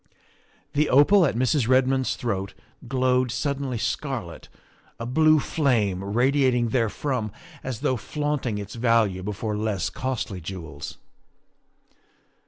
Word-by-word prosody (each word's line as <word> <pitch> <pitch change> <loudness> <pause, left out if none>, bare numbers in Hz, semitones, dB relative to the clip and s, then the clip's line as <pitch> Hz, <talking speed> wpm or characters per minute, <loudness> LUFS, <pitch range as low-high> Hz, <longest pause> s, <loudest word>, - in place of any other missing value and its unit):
The 150 +1 +2
opal 165 +7 +6
at 130 - -2
Mrs. 130 +1 +1
Redmond's 130 0 +2
throat 100 -5 -3 0.3
glowed 130 0 +2
suddenly 135 0 -2
scarlet, - - -4 0.5
a 115 - -4
blue 155 +5 +4
flame 115 - +1
radiating 125 +3 +2
therefrom 115 -1 -1 0.3
as 130 -4 -5
though 130 - +1
flaunting 145 -4 -2
its 100 0 -6
value 115 -5 +2
before 105 +2 -3
less 105 -7 -1
costly 115 -5 -3
jewels. 80 -5 -7
125 Hz, 110 wpm, -25 LUFS, 105-135 Hz, 0.5 s, opal